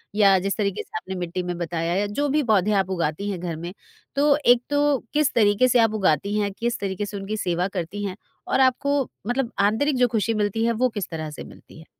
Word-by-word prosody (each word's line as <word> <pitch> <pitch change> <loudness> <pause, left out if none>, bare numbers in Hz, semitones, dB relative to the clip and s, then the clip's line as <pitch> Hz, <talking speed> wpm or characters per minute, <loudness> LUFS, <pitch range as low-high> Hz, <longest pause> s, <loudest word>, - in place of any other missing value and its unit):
या 200 -2 +5
जिस 195 +2 -2
तरीके 200 -3 -1
से - - -7
आपने 190 +2 -6
मिट्टी 180 0 -3
में 175 -1 -4
बताया 170 0 -2
या 200 +2 +1
जो 285 +9 -1
भी 300 +2 +2
पौधे 215 -4 +2
आप 195 -2 +1
उगातीं 170 +2 -2
हैं 185 - -4
घर 170 -2 -4
में, 170 +3 -7 0.4
तो 285 0 +4
एक 245 0 +5
तो 290 -1 +2 0.2
किस 300 -1 +2
तरीके 210 +2 +4
से 250 -1 +3
आप 225 -2 +3
उगातीं 200 0 +1
हैं? 200 -1 -1
किस 235 +3 -2
तरीके 195 +1 -3
से 205 0 -6
उनकी 200 +2 -4
सेवा 180 -2 0
करती 190 +1 -5
हैं? 190 -2 -4 0.3
और - - +1
आपको 270 +1 +2 0.2
मतलब 245 0 -1
आंतरिक 220 +9 +2
जो 250 0 +4
खुशी 225 -1 0
मिलती 210 +1 0
है 235 - +2
वो 250 +3 +1
किस 205 -5 -5
तरह 155 -2 -5
से 150 - -8
मिलती - - -15
है? 160 - -14
205 Hz, 235 wpm, -23 LUFS, 185-240 Hz, 0.4 s, या